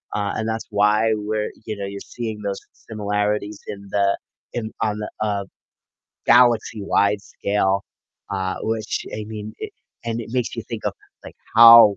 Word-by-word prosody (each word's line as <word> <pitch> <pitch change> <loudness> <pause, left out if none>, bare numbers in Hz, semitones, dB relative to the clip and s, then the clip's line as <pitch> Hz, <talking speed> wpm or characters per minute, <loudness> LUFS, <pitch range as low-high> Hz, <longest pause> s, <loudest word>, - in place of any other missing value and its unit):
Uh, 100 -1 0
and 110 - -1
that's 110 0 -2
why 105 +2 +4
we're 105 0 -2
you 110 - -3
know, 100 - -3
you're 100 0 -5
seeing 110 -3 -5
those 100 -1 -2 0.3
similarities 105 -1 -1
in 100 0 -6
the 100 -1 +3 0.4
in 110 -2 -3
on 105 -1 +1
the, 105 - -4
uh, 100 -2 0 0.8
galaxy-wide 110 -4 +4
scale, 100 -1 0 0.5
uh, 95 -1 -1
which 110 -1 -2
I 105 0 -4
mean, 110 0 -6
it - - -6 0.3
and 115 0 -2
it 115 - -7
makes 125 -2 0
you - - -3
think - - -5
of - - +1 0.3
like, - - -10 0.2
how 115 -3 +10
105 Hz, 160 wpm, -23 LUFS, 100-110 Hz, 0.8 s, how